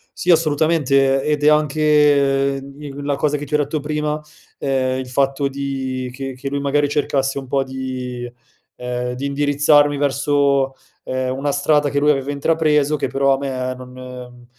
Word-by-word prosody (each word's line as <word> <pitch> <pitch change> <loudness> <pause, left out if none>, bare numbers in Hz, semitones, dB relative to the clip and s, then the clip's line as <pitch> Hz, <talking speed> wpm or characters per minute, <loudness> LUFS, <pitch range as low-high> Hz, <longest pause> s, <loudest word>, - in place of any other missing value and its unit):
Sì, 180 - -4
assolutamente, 145 -4 +3
ed 150 -1 0
è - - +4
anche, 145 -2 +3
ehm, - - -11
mhmm, 140 +2 -12 0.2
in - - -6
la 145 0 0
cosa 150 +1 0
che 145 0 -4
ti 150 - -1
ho - - +5
detto 150 +1 -1
prima, 150 +1 -2 0.4
ehm, 130 -1 0
il 130 - -5
fatto 135 +2 +1
di 135 -2 -4
che 135 0 -6
che 135 +2 -5
lui 140 0 -2
magari 145 +1 +1
cercasse 140 -2 0
un 135 - -10
po' 135 +1 +1
di 130 -2 -5 0.4
ehm, 125 0 -4
di 130 +3 -5
indirizzarmi 145 +1 +3
verso, 140 -1 +1 0.3
ehm, 130 0 -2
una 140 +1 -1
strada 145 +1 +2
che 140 - -3
lui 150 +1 +4
aveva 135 0 -2
intrapreso 150 0 +2
che - - -1
però 135 0 +2
a - - 0
me 130 -2 -3
non 130 0 -11
mhmm, 125 -1 -10
140 Hz, 180 wpm, -20 LUFS, 130-145 Hz, 0.4 s, ho